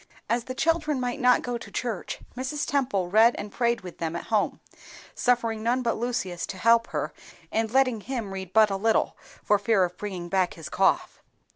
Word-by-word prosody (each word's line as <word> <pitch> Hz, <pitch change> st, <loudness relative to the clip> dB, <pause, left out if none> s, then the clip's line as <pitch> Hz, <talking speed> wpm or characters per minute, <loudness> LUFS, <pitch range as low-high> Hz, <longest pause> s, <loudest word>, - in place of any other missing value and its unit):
As 235 Hz, 0 st, 0 dB
the 255 Hz, -, -5 dB
children 310 Hz, -2 st, +1 dB
might 245 Hz, -1 st, -2 dB
not 250 Hz, -1 st, +4 dB
go 245 Hz, -1 st, -3 dB
to -, -, -10 dB
church, 230 Hz, -7 st, -3 dB, 0.2 s
Mrs. 265 Hz, +4 st, -2 dB
Temple 205 Hz, -11 st, 0 dB
read 225 Hz, +3 st, +6 dB
and 205 Hz, 0 st, -6 dB
prayed 235 Hz, +1 st, 0 dB
with 180 Hz, -2 st, -10 dB
them 165 Hz, 0 st, -2 dB
at 170 Hz, -, -4 dB
home, 210 Hz, -, +1 dB, 0.5 s
suffering 230 Hz, -3 st, +1 dB
none 245 Hz, +3 st, +1 dB
but 230 Hz, -, +1 dB
Lucius 220 Hz, -7 st, -2 dB
to 190 Hz, -, -6 dB
help 230 Hz, +3 st, +4 dB
her, -, -, -3 dB, 0.4 s
and 225 Hz, 0 st, 0 dB
letting 255 Hz, -2 st, +2 dB
him 230 Hz, -5 st, -4 dB
read 190 Hz, -2 st, -6 dB
but 215 Hz, -1 st, +5 dB
little, 210 Hz, +3 st, +1 dB, 0.3 s
for 210 Hz, -, +3 dB
fear 205 Hz, -2 st, +3 dB
of 180 Hz, 0 st, -3 dB
bringing 185 Hz, -4 st, -5 dB
back 185 Hz, 0 st, +1 dB
his 165 Hz, -, -8 dB
cough. -, -, +1 dB
225 Hz, 190 wpm, -26 LUFS, 195-245 Hz, 0.5 s, read